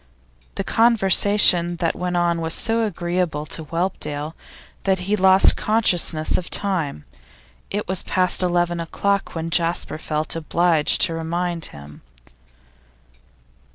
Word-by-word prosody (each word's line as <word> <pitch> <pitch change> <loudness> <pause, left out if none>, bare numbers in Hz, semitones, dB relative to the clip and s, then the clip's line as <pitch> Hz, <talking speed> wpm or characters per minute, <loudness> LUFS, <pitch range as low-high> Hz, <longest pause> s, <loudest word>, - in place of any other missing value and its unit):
The - - -2
conversation 200 -5 +3
that 165 -1 -1
went 180 0 -3
on 170 -1 0
was 160 0 +1
so 225 0 +1
agreeable 175 -4 -3
to 160 +1 -5
Whelpdale, 160 -3 -3 0.5
that 190 -1 +1
he 200 +3 0
lost 190 -1 +5
consciousness 180 -8 +1
of 180 - -8
time. 165 - -2 0.6
It 205 +1 -4
was 185 0 -2
past 185 0 +1
eleven 175 -1 0
o'clock 200 +4 -2
when 165 0 -4
Jasper 170 -2 0
felt 155 0 -3
obliged 165 -1 +1
to 170 - +2
remind 170 +1 -3
him. 70 0 -12
175 Hz, 120 wpm, -21 LUFS, 165-190 Hz, 0.6 s, lost